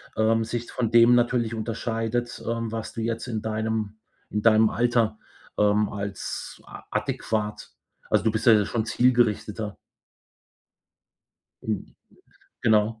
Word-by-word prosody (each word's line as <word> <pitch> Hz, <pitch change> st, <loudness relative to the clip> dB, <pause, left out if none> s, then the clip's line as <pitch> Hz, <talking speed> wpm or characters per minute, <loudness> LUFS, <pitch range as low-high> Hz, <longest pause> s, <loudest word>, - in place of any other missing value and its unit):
ähm, 115 Hz, +1 st, +2 dB
sich 120 Hz, +1 st, -4 dB
von 115 Hz, -3 st, -1 dB
dem 120 Hz, +1 st, +7 dB
natürlich 120 Hz, -1 st, +1 dB
unterscheidet, 115 Hz, +1 st, -3 dB
ähm, 115 Hz, -1 st, -2 dB
was 115 Hz, -1 st, -5 dB
du 115 Hz, -, -4 dB
jetzt 115 Hz, +2 st, -3 dB
in 110 Hz, -3 st, -3 dB
deinem 110 Hz, -1 st, -2 dB, 0.3 s
in 105 Hz, -, -2 dB
deinem 110 Hz, 0 st, +5 dB
Alter, 115 Hz, -2 st, +1 dB, 0.4 s
ähm, 105 Hz, 0 st, +3 dB
als 100 Hz, -2 st, -5 dB
a -, -, -11 dB
adäquat 105 Hz, -1 st, -2 dB, 0.4 s
also, 105 Hz, -2 st, +2 dB
du 110 Hz, -, +4 dB
bist 110 Hz, -, -2 dB
ja 115 Hz, -, +8 dB
jetzt 105 Hz, -2 st, +3 dB
schon 115 Hz, -2 st, -1 dB
zielgerichteter. 110 Hz, -4 st, +1 dB, 1.9 s
Hm. 110 Hz, -2 st, -4 dB, 0.7 s
Genau. 110 Hz, 0 st, +2 dB
110 Hz, 130 wpm, -25 LUFS, 110-115 Hz, 1.9 s, ja